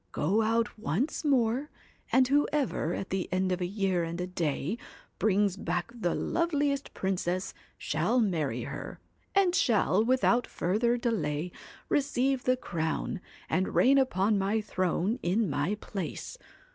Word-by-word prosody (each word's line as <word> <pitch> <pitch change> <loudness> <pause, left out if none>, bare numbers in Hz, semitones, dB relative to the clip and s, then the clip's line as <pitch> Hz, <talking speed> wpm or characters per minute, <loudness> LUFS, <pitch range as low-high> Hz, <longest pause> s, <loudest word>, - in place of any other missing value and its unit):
Go 195 +9 +2
out 225 0 0
once 230 - -1
more, 265 -1 +2 0.4
and 260 0 +5
whoever, 280 - +1
at 195 - -5
the 190 -1 -2
end 185 0 +1
of 180 0 -1
a 175 - 0
year 190 -3 0
and 165 +1 -4
a 180 - -1
day, 175 - -2 0.4
brings 205 -2 +2
back 175 +2 -2
the 215 -8 -1
loveliest 290 -4 0
princess, 185 -1 -1 0.2
shall 250 - +1
marry 155 - 0
her, 140 +3 -7 0.4
and 385 -3 +4
shall, 215 - +3
without 245 0 +3
further 235 +7 +1
delay, 180 - -1 0.4
receive 270 -2 +1
the 255 0 +3
crown, 165 -5 -2 0.3
and 185 +4 0
reign 275 +2 +6
upon 205 -5 +2
my 200 +3 +1
throne 190 +2 -1
in 200 +5 +1
my 145 +6 0
place. 200 - -5
205 Hz, 140 wpm, -29 LUFS, 180-250 Hz, 0.4 s, reign